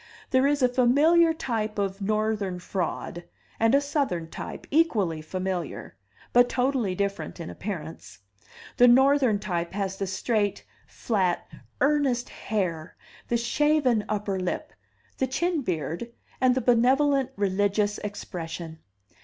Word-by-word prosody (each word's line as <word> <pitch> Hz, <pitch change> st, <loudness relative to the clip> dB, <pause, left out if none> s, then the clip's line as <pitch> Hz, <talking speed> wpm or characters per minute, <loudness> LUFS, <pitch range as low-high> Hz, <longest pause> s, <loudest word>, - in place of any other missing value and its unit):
There 260 Hz, +1 st, +4 dB
is 290 Hz, -1 st, +1 dB
a -, -, +7 dB
familiar 290 Hz, +7 st, +4 dB
type 225 Hz, -9 st, -3 dB
of 195 Hz, 0 st, -2 dB
Northern 215 Hz, -2 st, -1 dB
fraud, 175 Hz, -1 st, -4 dB, 0.4 s
and 225 Hz, +3 st, +4 dB
a -, -, +6 dB
Southern 265 Hz, -, -2 dB
type, -, -, -7 dB
equally 215 Hz, -, +2 dB
familiar, 185 Hz, -, -4 dB, 0.4 s
but 245 Hz, 0 st, +6 dB
totally 250 Hz, -7 st, 0 dB
different 200 Hz, -1 st, -3 dB
in 165 Hz, -, -6 dB
appearance. 165 Hz, -6 st, -7 dB, 0.6 s
The 245 Hz, -, +7 dB
Northern 265 Hz, -2 st, +5 dB
type 175 Hz, -4 st, -3 dB
has 195 Hz, -1 st, -2 dB
the 195 Hz, -, -2 dB
straight, 205 Hz, +2 st, -1 dB, 0.2 s
flat, 190 Hz, -6 st, -1 dB, 0.4 s
earnest 275 Hz, -4 st, +2 dB
hair, 180 Hz, -7 st, -3 dB, 0.3 s
the 235 Hz, -, +1 dB
shaven 255 Hz, -1 st, +2 dB
upper 205 Hz, -2 st, -1 dB
lip, 180 Hz, -1 st, -3 dB, 0.5 s
the 265 Hz, -, +1 dB
chin 340 Hz, +4 st, 0 dB
beard, 175 Hz, -, -3 dB, 0.3 s
and 255 Hz, -1 st, +4 dB
the 260 Hz, -, 0 dB
benevolent 265 Hz, +3 st, +3 dB
religious 205 Hz, +1 st, +1 dB
expression. 170 Hz, -5 st, -6 dB
215 Hz, 125 wpm, -26 LUFS, 190-260 Hz, 0.6 s, a